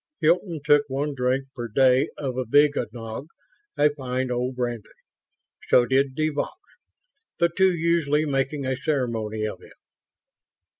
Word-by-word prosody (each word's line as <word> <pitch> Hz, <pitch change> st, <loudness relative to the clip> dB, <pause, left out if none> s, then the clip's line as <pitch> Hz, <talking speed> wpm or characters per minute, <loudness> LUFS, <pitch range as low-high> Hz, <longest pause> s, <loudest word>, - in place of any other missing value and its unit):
Hilton 165 Hz, 0 st, +1 dB
took 145 Hz, -2 st, +6 dB
one 140 Hz, +2 st, -2 dB
drink 130 Hz, +1 st, 0 dB
per 120 Hz, -1 st, -4 dB
day 130 Hz, +5 st, +3 dB
of 135 Hz, -3 st, -3 dB
avignognac, 125 Hz, -2 st, 0 dB, 0.5 s
a 150 Hz, 0 st, +4 dB
fine 130 Hz, -2 st, -3 dB
old 125 Hz, +1 st, -2 dB
brandy. 120 Hz, -3 st, -3 dB, 0.8 s
So 120 Hz, -, +5 dB
did 135 Hz, +1 st, +1 dB
de 155 Hz, +1 st, +1 dB
Vaux 145 Hz, -1 st, -2 dB, 0.9 s
the 170 Hz, 0 st, +3 dB
two 190 Hz, 0 st, +4 dB
usually 160 Hz, -3 st, +1 dB
making 140 Hz, 0 st, -1 dB
a 130 Hz, 0 st, 0 dB
ceremony 115 Hz, -6 st, -2 dB
of 105 Hz, -, -5 dB
it. -, -, -16 dB
135 Hz, 135 wpm, -24 LUFS, 125-150 Hz, 0.9 s, took